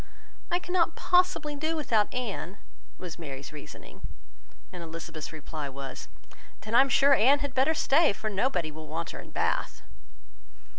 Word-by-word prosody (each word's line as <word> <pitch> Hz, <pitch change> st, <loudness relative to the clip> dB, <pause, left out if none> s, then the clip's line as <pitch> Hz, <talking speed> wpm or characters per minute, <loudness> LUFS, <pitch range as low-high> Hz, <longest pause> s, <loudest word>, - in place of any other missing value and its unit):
"I 350 Hz, -, +2 dB
cannot 355 Hz, -2 st, +1 dB
possibly 355 Hz, -5 st, +2 dB
do 315 Hz, +3 st, -1 dB
without 225 Hz, -9 st, +1 dB
Anne," 210 Hz, -6 st, -4 dB, 0.4 s
was 175 Hz, -2 st, -8 dB
Mary's 140 Hz, -3 st, -7 dB
reasoning; 150 Hz, -, -11 dB, 0.7 s
and 180 Hz, -, -7 dB
Elizabeth's 165 Hz, -1 st, -7 dB
reply 155 Hz, -2 st, -6 dB
was, 135 Hz, 0 st, -7 dB, 0.5 s
"Then 215 Hz, -, -7 dB
I 240 Hz, -, +8 dB
am 275 Hz, -, +2 dB
sure 280 Hz, +1 st, +6 dB
Anne 270 Hz, +3 st, +6 dB
had 285 Hz, -2 st, -4 dB
better 270 Hz, +5 st, +3 dB
stay, 305 Hz, +2 st, +4 dB
for 215 Hz, +2 st, -5 dB
nobody 200 Hz, -6 st, 0 dB
will 155 Hz, +1 st, -9 dB
want 165 Hz, +2 st, -4 dB
her -, -, -8 dB
in -, -, -10 dB
Bath." -, -, -1 dB
215 Hz, 155 wpm, -28 LUFS, -, 0.7 s, I